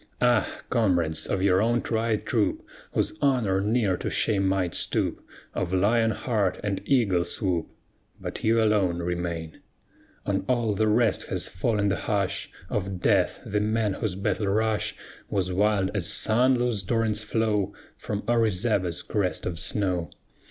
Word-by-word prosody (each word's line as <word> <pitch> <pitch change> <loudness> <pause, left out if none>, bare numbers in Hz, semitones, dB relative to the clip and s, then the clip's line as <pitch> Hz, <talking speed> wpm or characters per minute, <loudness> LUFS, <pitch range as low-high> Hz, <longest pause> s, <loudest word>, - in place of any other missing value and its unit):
Ah, 120 -3 +3 0.2
comrades, 85 -9 +1
of 95 -1 -1
your 95 -1 +4
own 120 +2 +1
tried 110 -1 -1
troop, - - 0 0.3
Whose - - 0
honor 120 -9 +2
ne'er 105 -3 +1
to - - -3
shame 95 -3 +2
might 95 -3 0
stoop, - - -1 0.3
Of 90 0 -2
lion 115 +4 +3
heart 110 -5 -1
and 100 -2 -2
eagle 100 -10 +2
swoop, 85 -2 -2 0.5
But - - -6
you 115 +1 +3
alone 100 -5 +2
remain; 85 -2 -3 0.7
On - - 0
all 120 -4 +2
the 110 +2 +1
rest 110 +1 +2
has - - -1
fallen 105 +1 0
the 100 - 0
hush 100 -3 -1 0.2
Of 95 -2 -3
death; - - +2
the 105 - 0
men 110 -1 +1
whose 95 -1 -3
battle 100 +2 -1
rush 110 +2 0 0.3
Was 95 -2 -1
wild 100 0 +2
as 100 -5 0
sun 120 +5 +3
loosed 120 -6 -1
torrent's 115 -2 +1
flow 105 -2 0 0.2
From 105 -1 -4
Orizaba's 105 -6 +1
crest 100 -4 -1
of 85 -2 -3
snow. 90 -1 -1
105 Hz, 150 wpm, -26 LUFS, 95-110 Hz, 0.7 s, your